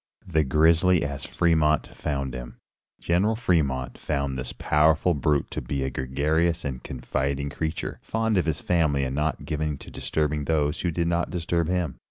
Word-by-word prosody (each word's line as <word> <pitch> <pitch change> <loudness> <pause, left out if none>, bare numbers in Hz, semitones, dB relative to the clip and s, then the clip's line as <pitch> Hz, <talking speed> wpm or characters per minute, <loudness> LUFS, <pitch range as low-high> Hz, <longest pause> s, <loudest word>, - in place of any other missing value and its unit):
XII. 90 - -13
THE 80 -1 +3
GRIZZLY 80 +5 +4
AS 70 0 -4
FREMONT 80 -3 +2
FOUND 70 -3 -3
HIM. 60 -1 -7 0.4
General 95 +6 +2
Fremont 70 - 0
found 70 -1 -2
this 65 -1 -3
powerful 80 +3 +3
brute 75 -1 0
to - - -3
be 70 -2 -2
a 65 - -2
gregarious 75 +7 0
and 65 -3 -4
confiding 70 +3 -2
creature, 80 +3 -3
fond 110 -1 0
of 90 - +2
his 80 -2 -1
family 80 -6 +2
and 65 0 -2
not 75 +2 -1
given 75 -1 -2
to - - -11
disturbing 75 -1 -1
those 75 -2 +1
who 90 - 0
did 85 0 0
not 85 0 0
disturb 85 -1 -1
him. 90 -5 -1
75 Hz, 175 wpm, -26 LUFS, 70-85 Hz, 0.4 s, GRIZZLY